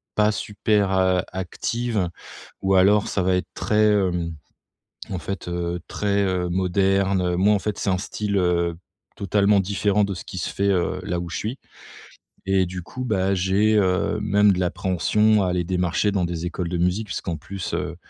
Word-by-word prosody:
pas 105 0 +3
super, 105 -1 0
heu, 95 -1 +3
active 100 +2 -2 0.5
ou 95 0 +2
alors 100 +3 +4
ça 95 - 0
va 90 0 +2
être 90 - -2
très, 105 0 +2
hem, 90 -4 0 0.8
en 95 - -2
fait, 100 +1 -6
heu, 85 0 -2
très, 100 -1 0
heu, 90 -2 0
moderne. 95 0 +1
Moi, 100 +4 +4
en 100 - 0
fait, 105 0 -3
c'est - - -1
un 95 - +1
style, 105 0 -2
heu, 85 -2 +1 0.4
totalement 100 0 +3
différent 100 +1 +1
de 100 - -3
ce - - -7
qui 95 - -8
se - - -2
fait, 100 - -1
heu, 90 -1 0
là 90 -1 -2
où 85 0 -5
je - - -4
suis. 115 +6 -4 0.9
Et 95 -1 +4
du 90 +1 -6
coup, 130 +9 -7
bah 100 -4 +1
j'ai, 95 +4 +2
heu, 95 +1 +1
même 105 -1 +4
de 90 - -2
l'appréhension 100 +4 +2
à - - 0
aller 90 -1 0
démarcher 90 +3 0
dans 95 -3 0
des 85 0 -4
écoles 90 0 -3
de 90 - -2
musique. 90 +5 0
Puisqu'en 85 -3 -3
plus, 90 +4 -6
heu - - -3
95 Hz, 185 wpm, -23 LUFS, 90-105 Hz, 0.9 s, alors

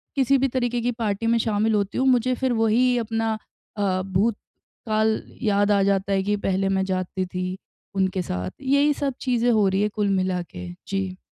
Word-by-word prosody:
किसी 275 0 +3
भी 270 +1 +2
तरीके 245 -2 -1
की 245 +1 0
पार्टी 210 +1 -1
में 230 0 +3
शामिल 220 0 +1
होती 200 -1 -1
हूँ, 265 - +2
मुझे 255 -1 +3
फिर 260 0 0
वही 235 +3 +3
अपना 225 -1 -1 0.4
अ, 190 -2 +1
भूतकाल 215 +2 -1 0.2
याद 205 -3 +2
आ 200 -1 +4
जाता 195 0 +1
है 195 0 +1
कि 205 +1 +1
पहले 195 0 +1
मैं 190 0 +1
जाती 185 0 -2
थी, 185 +1 -4 0.4
उनके 190 -1 +1
साथ। 90 - -4
यही 280 +2 +3
सब 280 -1 -2
चीज़ें 245 -2 +2
हो 215 -3 +3
रही 190 +1 +1
हैं 210 - +2
कुल 210 -2 +1
मिला 185 -1 0
के। 90 0 -7 0.2
जी। 190 -1 -3
210 Hz, 190 wpm, -24 LUFS, 190-240 Hz, 0.4 s, आ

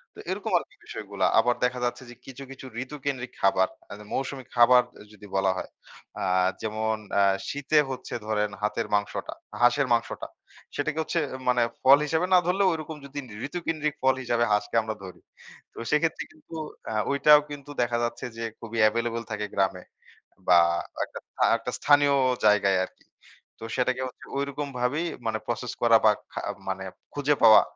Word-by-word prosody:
তো - - -13
এরকম - - -3
আরকি - - -13
বিষয়গুলা। - - -3
আবার 120 0 +3
দেখা 125 0 -1
যাচ্ছে 120 +2 -3
যে 120 - -11
কিছু, 135 +1 -9
কিছু 135 0 -10 0.2
ঋতুকেন্দ্রিক 130 -2 -5
খাবার, 95 -1 +4 0.2
আ - - -5
যে - - -10
মৌসুমী 135 0 -3
খাবার 125 +1 +7 0.2
অ - - -12
যদি 105 -1 -13
বলা 95 0 +3
হয়, - - -5 0.5
আ - - -1 0.4
যেমন 110 0 -1 0.2
আ - - +6 0.3
শীতে 145 +2 0
হচ্ছে 130 -1 -6
ধরেন 105 -1 0
হাতের 110 +2 -1
মাংসটা, 100 0 -2 0.3
হাঁসের 125 +3 +4
মাংসটা। 115 0 -1 0.5
সেটাকে 155 +2 -1
হচ্ছে 170 - -1 0.3
মানে 125 -1 +3 0.2
ফল 135 +2 +8
হিসেবে 160 +3 +1
না - - +9
ধরলেও, 190 +2 +3
ঐরকম 160 -1 -6
যদি 140 +1 -6 0.3
ঋতুকেন্দ্রিক 155 -2 -2
ফল 130 0 +4
হিসাবে 120 -1 +1
হাঁসকে 105 +1 0
আমরা 110 0 -4
ধরি, 90 -3 -10 0.5
তো - - -20
সেক্ষেত্রে 155 +2 +1
কিন্তু 155 +1 -18 0.3
অ্যা 110 - -4 0.2
ঐটাও 145 +1 +6
কিন্তু 145 0 -8
দেখা 120 0 +1
যাচ্ছে 120 - -3
যে, 115 - -4 0.2
খুবই 115 -1 -7
অ্যাভেইলেবল 115 +1 +1
থাকে 105 0 -2
গ্রামে 95 -2 0 0.6
বা 90 - +7 0.5
একটা - - -9
স্থা - - -2
একটা 115 +2 -5
স্থানীয় 145 -1 +5 0.3
জায়গায় 100 -2 +4
আরকি। - - -22 0.5
তো - - -10
সেটাকে 130 0 +1
হচ্ছে 125 - -12
ঐরকমভাবেই 140 +1 -2 0.2
মানে 110 -1 0
প্রসেস 120 0 -3
করা 115 -1 +6
বা 110 - +8 0.2
খা - - -3 0.3
মানে - - -3 0.3
খুঁজে 145 0 +2
পাওয়া, 110 -1 +9
125 Hz, 165 wpm, -26 LUFS, 110-145 Hz, 0.6 s, না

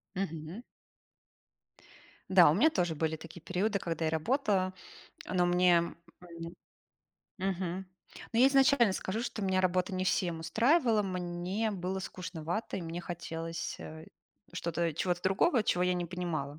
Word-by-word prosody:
Мгм. 170 +3 -4 1.7
Да, - - +7
у - - +4
меня 315 - +5
тоже 175 - 0
были 160 +1 0
такие 165 +1 -11
периоды, 200 +4 0
когда 165 -2 -2
я 155 - +1
работала. 190 - +1 0.5
Но 180 -1 +1
мне 175 -1 +3 0.3
М, 170 0 -9 0.8
мгм. 185 0 -2 0.5
Ну 230 - +3
я 260 - +8
изначально 270 -6 +5
скажу, 195 +4 -3
что 230 -4 -4
меня 190 -1 +2
работа 185 +1 +1
не 185 0 -1
всем 175 -3 0
устраивала, 230 - +3
мне 185 +3 -2
было 190 0 -3
скучновато, 180 +2 -4
и 180 - -4
мне 165 +1 -5
хотелось, 165 -1 -5
э, 160 0 -9 0.5
что-то 170 -1 -1
чего-то 175 +2 -1
другого, 210 - +3
чего 180 -3 +1
я 180 0 +2
не 175 -1 -2
понимала. 160 -5 -4
180 Hz, 140 wpm, -31 LUFS, 170-195 Hz, 1.7 s, я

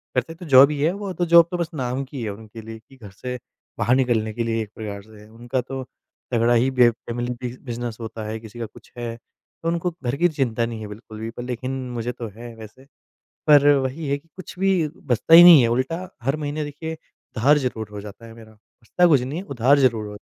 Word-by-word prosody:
करते 130 +6 -1
तो 175 +2 -11
जॉब 140 -1 +7
ही 150 - -3
है, 160 - +3
वो 200 -1 -5
तो 175 - -1
जॉब 170 -1 +8
तो 180 - -2
बस 170 -2 -2
नाम 130 -2 -2
की 135 -1 -8
है 110 - -3
उनके 110 +2 -9
लिए 110 +1 -9
कि 135 - -17
घर 110 -5 -11
से 125 +6 -6 0.4
बाहर 125 - +3
निकलने 120 -4 +1
के 115 +1 -2
लिए 115 0 -1
एक 105 - -12
प्रकार 105 -2 -6
से 110 0 -16
है। 105 - -16
उनका 120 +3 -3
तो 130 +1 -6 0.5
तगड़ा 120 0 +3
ही 120 +3 +3
बे 125 -2 +5
फ़ैमिली 120 +1 -5
बि 125 0 -5
बिज़नेस 120 -2 -5
होता 110 -1 -6
है, 110 +1 -4
किसी 110 +1 -12
का 115 - -3
कुछ 110 - -16
है। 120 -1 -4
तो 120 +7 -13
उनको 170 +1 -1
घर 120 +1 -1
की 175 +3 +4
चिंता 125 -7 -1
नहीं 115 -1 -6
है 105 - -6
बिल्कुल 110 +1 -11
भी 110 +1 -4
पर 120 - -8
लेकिन 125 +1 -4 0.2
मुझे 120 0 -3
तो 120 -1 -7
है 120 0 -9
वैसे। 110 +4 -13 0.6
पर 145 -2 +6
वही 135 +3 -3
है 140 +1 0
कि 165 - -27
कुछ 185 -1 -10
भी 190 -4 +2
बचता 130 +4 +2
ही 170 - +12
नहीं 170 -7 +10
है 115 - +2
उल्टा 165 +8 -3
हर 135 +5 0
महीने 150 0 -3
देखिए 160 +3 -6 0.4
उधार 140 +6 +4
ज़रूर 120 -6 -3
हो 105 -1 -7
जाता 105 +3 -11
है 115 - -12
मेरा। 110 -1 -14
बचता 115 +10 -1
कुछ 145 -6 +5
नहीं 135 +6 -4
है, 185 - -6
उधार 140 - +3
ज़रूर 115 -6 +2
हो 105 - -9
125 Hz, 240 wpm, -23 LUFS, 115-145 Hz, 0.6 s, ही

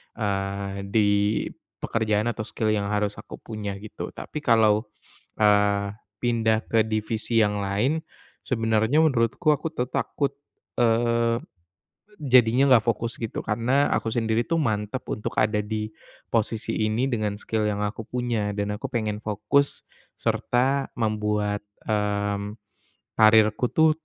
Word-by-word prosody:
eee, 100 -2 -3
di 105 0 +3 0.7
pekerjaan 110 0 +1
atau 110 - -5
skill 110 -1 -1
yang 100 -2 0
harus 105 0 -1
aku - - -9
punya, 105 -3 -5
gitu. 105 +2 -7
Tapi 150 - -6
kalau, 110 -5 +3 0.5
eee, 105 -1 +3 0.2
pindah 115 -2 +1
ke 115 -1 +3
divisi 110 +1 -1
yang 105 -2 +2
lain 120 +11 0 0.4
sebenarnya 115 +3 +1
menurutku 150 +1 +3
aku 160 - -4
tuh 125 -6 -2
takut, 140 +2 -2 0.4
eee, 115 0 +2 0.8
jadinya 130 0 +5
nggak 120 -4 +5
fokus 115 0 -1
gitu, 115 -2 -4
karena 125 +6 +1
aku 115 0 0
sendiri 115 -1 +1
tuh 165 -2 +1
mantap 110 +1 -1
untuk 105 - -3
ada 105 0 +2
di 105 +1 -3 0.4
posisi 110 -1 0
ini 120 +5 0
dengan 105 -3 -1
skill 110 +1 -2
yang 105 -1 -1
aku 105 +2 -4
punya 115 -5 -2
dan 100 0 -2
aku 135 - -4
pengen 110 -5 -2
fokus 110 +7 0 0.3
serta 135 +3 0
membuat, 105 -2 -1 0.2
mmm, 105 -1 -1 0.7
karierku 110 +2 +5
tuh 160 0 +6
110 Hz, 130 wpm, -25 LUFS, 105-120 Hz, 0.8 s, tuh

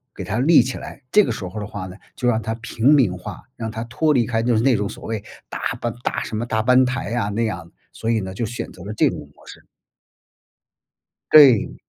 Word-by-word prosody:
给 - - -6
它 110 - -2
立 150 +4 +6
起 130 +2 -4
来， 135 - -10
这 210 - +6
个 - - -2
时 95 - -6
候 95 +5 -7
的 105 - -5
话 105 -3 -6
呢， 90 +1 -11 0.2
就 125 - -5
让 115 -2 +1
他 110 0 -3
平 115 +4 +1
民 115 -11 +3
化， 90 - -9
让 110 -1 -4
他 110 +1 -5
脱 150 +6 +1
离 120 -4 +2
开 115 -1 -1
就 120 0 +2
是 110 - +2
那 135 -1 +4
种 100 0 -1
所 - - -10
谓 110 -2 -3 0.3
大 - - -6 0.2
班 120 -2 -2
大 - - -2
什 110 - -5
么 115 - -2
大 110 -2 0
班 125 +2 +5
台 125 -2 -3
啊， 115 -4 0
那 110 +3 -1
样。 85 -6 -5 0.2
所 115 - -5
以 115 - +2
呢， 95 -1 -6
就 115 +5 -3
选 120 +2 -6
择 90 - -12
了 105 +2 -6
这 - - +3
种 - - -6 0.2
模 - - -21
式。 - - -13 1.7
对。 140 -8 +7
115 Hz, 265 characters per minute, -21 LUFS, 105-125 Hz, 1.7 s, 对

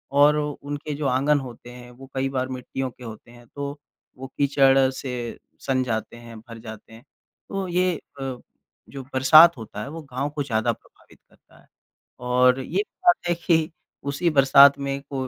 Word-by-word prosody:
और 145 +1 +6
उनके 145 0 -4
जो 145 0 -4
आँगन 140 +3 +2
होते 120 -2 -10
हैं, 125 0 -12
वो 130 +2 -14
कई 135 0 0
बार 130 -1 -2
मिट्टियों 130 +1 -5
के 125 - -16
होते 115 0 -10
हैं, 120 0 -16
तो 140 +2 -6 0.4
वो 135 - -8
कीचड़ 135 -1 +4
से 125 -3 -6 0.2
सन 130 -1 0
जाते 115 -1 -4
हैं, 115 -1 -12
भर 115 +1 -12
जाते 110 0 -11
हैं। 115 +2 -14 0.5
तो 195 -1 -3
ये 180 0 +1 0.2
अ, 135 -2 -4 0.5
जो 135 -1 -8
बरसात 155 +5 +7
होता 110 -2 -8
है, - - -6
वो 165 +2 -8
गाँव 140 0 -4
को 145 - -1
ज़्यादा 110 -5 0
प्रभावित - - -23
करता - - -24
है। - - -27 0.5
और 125 +1 +3
ये 180 +9 -1 0.2
बात 355 - +7
है 175 - +2
कि 160 -2 +2 0.4
उसी 170 +5 0
बरसात 140 -1 +6
में 140 0 -3
कोई 130 -2 -3
135 Hz, 180 wpm, -23 LUFS, 125-145 Hz, 0.5 s, बरसात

